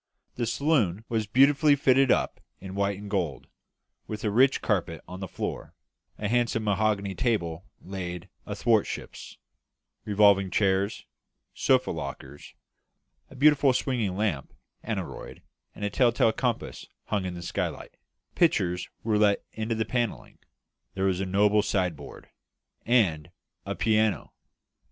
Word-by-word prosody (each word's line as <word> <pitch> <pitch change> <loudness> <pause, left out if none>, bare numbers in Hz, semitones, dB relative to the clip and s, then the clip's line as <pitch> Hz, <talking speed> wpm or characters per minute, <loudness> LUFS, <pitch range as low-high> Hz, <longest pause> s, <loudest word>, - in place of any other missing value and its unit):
The 120 -2 -2
saloon 115 - +1
was 110 -2 -1
beautifully 140 +6 +5
fitted 135 -1 +3
up - - +1 0.2
in 95 0 -8
white 100 0 0
and 105 +1 -9
gold, 90 - -2 0.6
with 105 -1 -6
a 105 - 0
rich 130 +5 +4
carpet 85 -6 -1
on 90 - -8
the 95 - -5
floor; - - -5 0.4
a 105 - -2
handsome 115 0 +1
mahogany 105 -1 0
table 95 -7 -1
laid 90 -2 -6 0.2
athwartships; 105 +1 -1 0.7
revolving 100 -2 +4
chairs; 100 +1 0 0.5
sofa - - +2
lockers; 70 +2 -8 0.7
a - - -14
beautiful 140 -1 +5
swinging 115 -8 -1
lamp, 100 -10 -2 0.3
aneroid, - - -6 0.3
and 105 -1 -4
tell 125 -2 +4
tale 115 -1 +2
compass 120 -1 -3 0.2
hung 105 -3 -2
in 90 -1 -4
the 85 - -7
skylight; - - -4 0.4
pictures 90 0 +1
were 110 -2 +1
let 105 -1 +3
into 110 +1 -3
the 110 0 -1
panelling; 120 -3 -3 0.6
there 95 0 0
was 95 -2 +1
a 95 - -2
noble 105 +2 +3
sideboard; 90 -7 -3 0.6
and 95 -11 +2 0.4
a - - -2
piano! 110 -1 +1
105 Hz, 130 wpm, -27 LUFS, 95-115 Hz, 0.7 s, beautifully